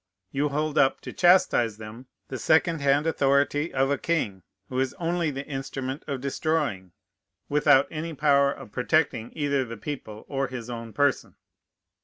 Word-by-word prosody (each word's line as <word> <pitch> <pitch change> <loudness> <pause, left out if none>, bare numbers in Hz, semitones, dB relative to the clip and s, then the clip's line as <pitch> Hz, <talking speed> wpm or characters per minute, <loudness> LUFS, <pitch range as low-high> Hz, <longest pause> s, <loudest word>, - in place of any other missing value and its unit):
You 145 +2 0
hold 155 +1 -1
up, 135 - +3
to - - -8
chastise 175 - +4
them, 110 +4 -10 0.2
the 130 - -5
second 160 0 +2
hand 140 +2 +3
authority 145 0 +1
of 135 +1 +1
a 140 - 0
king, 105 - -1 0.3
who 130 - -3
is 130 -1 -1
only 170 -1 -1
the 140 -1 -5
instrument 135 0 -5
of 140 -3 -3
destroying, 140 - -2 0.6
without 145 -1 +4
any 160 +1 -5
power 140 -1 +3
of 105 - -10
protecting 125 -3 0
either 140 -3 0
the 115 -2 -8
people 110 -3 -7
or 135 -1 -1
his 125 -1 -7
own 115 -1 -6
person. 145 +1 0
140 Hz, 160 wpm, -26 LUFS, 125-150 Hz, 0.6 s, chastise